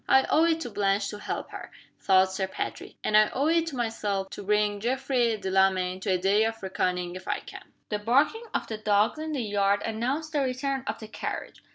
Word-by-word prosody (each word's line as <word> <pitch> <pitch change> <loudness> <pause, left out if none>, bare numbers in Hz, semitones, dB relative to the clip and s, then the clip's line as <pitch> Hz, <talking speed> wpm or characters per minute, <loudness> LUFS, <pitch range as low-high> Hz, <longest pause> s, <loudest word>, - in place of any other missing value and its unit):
"I 265 - +6
owe 320 +2 +5
it 330 -1 +2
to 245 - -5
Blanche 200 0 +1
to 210 - -7
help - - -5
her," - - -8 0.3
thought 190 -1 +4
Sir 190 0 -2
Patrick. 190 - -5
"And 210 - +1
I 215 0 +6
owe 275 - 0
it 330 +1 +2
to 305 - -4
myself 210 -5 -2
to - - -7
bring 210 0 +1
Geoffrey 245 -1 +1
Delamayn 190 -1 +1
to 190 - -4
a - - +3
day 195 +4 +3
of 225 -1 -4
reckoning 180 -2 -1
if 185 - -9
I - - -1
can." - - -12 0.2
The 210 - -1
barking 280 - +2
of - - -1
the 220 -1 -6
dogs 215 +5 +2
in 315 0 -4
the 265 -5 -1
yard 200 -1 +1
announced 255 +8 -2
the 295 -2 +1
return 265 +1 -1
of - - -2
the 220 - -9
carriage. 220 - -6
215 Hz, 220 wpm, -27 LUFS, 195-260 Hz, 0.3 s, I